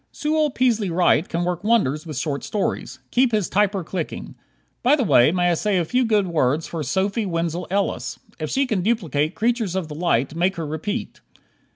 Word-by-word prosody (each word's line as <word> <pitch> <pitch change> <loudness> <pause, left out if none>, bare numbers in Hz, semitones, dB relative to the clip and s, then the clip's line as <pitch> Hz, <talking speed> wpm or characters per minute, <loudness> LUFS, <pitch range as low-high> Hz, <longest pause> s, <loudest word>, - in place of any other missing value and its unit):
Sewell 305 0 +1
Peaslee 235 -7 +1
Wright 175 -1 +2
can 170 +1 -1
work 180 +1 -2
wonders 170 - +1
with 155 -4 -5
short 145 -1 -2
stories. 210 - -2
Keep 250 0 +3
his 210 -4 +1
"typer" 200 -3 +1
clicking. 170 -2 -5 0.5
By 265 +4 +5
the 280 - 0
way, 135 - +5
may 175 0 +2
I - - +3
say 200 +3 0
a 175 - +1
few 250 +8 +1
good 210 -3 +2
words 155 -3 +1
for 165 - -5
Sophie 195 - -1
Wenzel 170 0 -2
Ellis? 200 +2 -1 0.2
If - - -3
she 275 +1 +1
can 215 -7 -1
duplicate 170 - 0
"Creatures 225 -4 0
of 180 -4 -2
the - - -6
Light," 150 -5 0
maker 175 +1 0
her - - -4
repeat. 160 +10 -4
185 Hz, 195 wpm, -22 LUFS, 165-220 Hz, 0.5 s, By